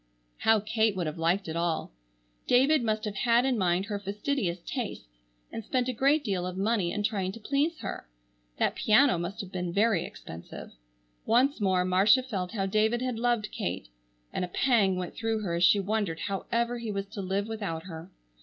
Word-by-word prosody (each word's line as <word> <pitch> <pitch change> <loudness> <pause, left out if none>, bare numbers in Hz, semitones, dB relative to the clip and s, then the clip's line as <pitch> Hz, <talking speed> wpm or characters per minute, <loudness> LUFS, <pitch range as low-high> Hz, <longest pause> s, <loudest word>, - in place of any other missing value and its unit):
How 220 -1 +4
Kate 220 0 +1
would 180 -2 -2
have 155 +1 -4
liked 175 +4 +1
it 160 - -4
all! 170 -1 -1 0.6
David 275 +4 +4
must 215 0 -1
have 205 -2 -4
had 240 +2 +3
in 265 -2 +2
mind 185 -2 +1
her 205 -1 -3
fastidious 200 -1 -2
tastes, 240 - -4 0.5
and 225 - -5
spent 250 +3 0
a 255 - -1
great 280 +5 +3
deal 190 -6 -1
of 185 0 -5
money 200 -3 +1
in 210 - -2
trying 195 -3 -1
to 230 - -9
please 285 +8 0
her. - - -6 0.5
That - - +1
piano 220 -2 +4
must 190 +6 -4
have 190 -2 -9
been 180 -2 -3
very 200 -1 +2
expensive. 85 +1 -9 0.6
Once 255 +2 +3
more 185 -2 +2
Marcia 195 +8 +4
felt 195 -7 -4
how 195 -4 -1
David 220 +5 +1
had 250 -3 -2
loved 235 -3 0
Kate 85 -8 -4 0.4
and - - -1
a - - -2
pang 200 -1 +2
went 180 -1 -4
through 225 -1 -2
her 175 -4 -2
as 170 +1 0
she 200 +3 +6
wondered 195 -5 -1
however 235 +5 -1
he 230 -2 -4
was 200 -1 -3
to 210 -1 -6
live 195 +2 -1
without 200 -8 -4
her. 165 -1 -9
205 Hz, 195 wpm, -28 LUFS, 185-235 Hz, 0.6 s, she